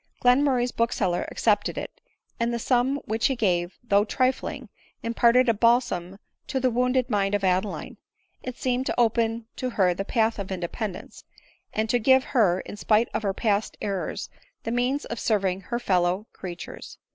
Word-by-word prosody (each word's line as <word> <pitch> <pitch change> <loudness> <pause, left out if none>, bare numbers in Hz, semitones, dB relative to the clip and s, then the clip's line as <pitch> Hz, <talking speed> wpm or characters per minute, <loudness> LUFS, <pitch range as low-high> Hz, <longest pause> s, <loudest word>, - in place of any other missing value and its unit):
Glen 250 +3 +4
murray's 250 -3 +1
bookseller 200 -7 0
accepted 210 -2 +1
it; - - -7 0.4
and 235 0 +1
the 235 - -1
sum 250 +3 +1
which 220 +1 +1
he 270 - 0
gave, 180 -6 0
though 205 -3 +3
trifling, 255 +3 -1 0.4
imparted 235 +2 +4
a 230 - +4
balsam 210 -5 +1 0.3
to 270 - -1
the 255 -1 +2
wounded 250 +1 +1
mind 200 -1 +1
of 205 - -2
Adeline; 185 +2 -1 0.4
it 255 -1 -6
seemed 255 0 -1
to - - -1
open 230 -1 +1
to 255 - -2
her 190 -6 +2
the 195 - -3
path 225 +1 +1
of 195 -1 -5
independence; 185 +2 -5 0.5
and 220 +1 -1
to 245 +2 +2
give 260 +3 +5
her, 195 -10 +2
in - - -9
spite 215 +2 +2
of - - -1
her 195 -2 -1
past 210 -2 0
er 195 -2 -2
rors, - - -5 0.4
the 230 - -3
means 250 +4 0
of 235 - -5
serving 195 -4 0
her 235 +5 -3
fellow 185 -2 +1
creatures. 175 -2 -8
225 Hz, 175 wpm, -25 LUFS, 195-245 Hz, 0.5 s, give